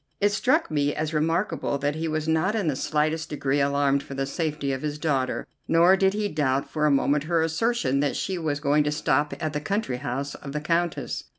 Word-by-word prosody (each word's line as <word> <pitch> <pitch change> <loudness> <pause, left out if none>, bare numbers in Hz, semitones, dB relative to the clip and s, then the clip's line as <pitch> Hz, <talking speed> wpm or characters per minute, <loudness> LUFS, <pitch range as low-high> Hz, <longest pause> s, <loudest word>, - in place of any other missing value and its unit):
It 205 0 +3
struck 260 - +1
me 145 -1 +1
as 155 +1 -2
remarkable 165 0 0
that 145 +1 -1
he 160 +2 -3
was 155 0 -2
not 160 +6 +1
in 205 -6 0
the 145 - +1
slightest 155 +3 -1
degree 140 -1 0
alarmed 140 0 +2
for 135 - -9
the 135 0 -1
safety 150 -1 -2
of 130 - -4
his 150 -1 -3
daughter, 140 -5 -1 0.2
nor 170 +3 +5
did 190 +1 +2
he 210 0 0
doubt 140 -6 0
for 150 -1 0
a - - +4
moment 140 +1 +2
her 165 0 +2
assertion 165 - 0
that 145 -1 0
she 190 -2 -2
was 150 -3 -1
going 150 0 +3
to 150 - +1
stop 150 -1 +1
at 155 -1 -2
the 150 - -2
country 195 - -1
house 135 +3 -4
of 140 -1 -8
the 150 - -1
Countess. 170 +2 -1
150 Hz, 220 wpm, -25 LUFS, 140-165 Hz, 0.2 s, nor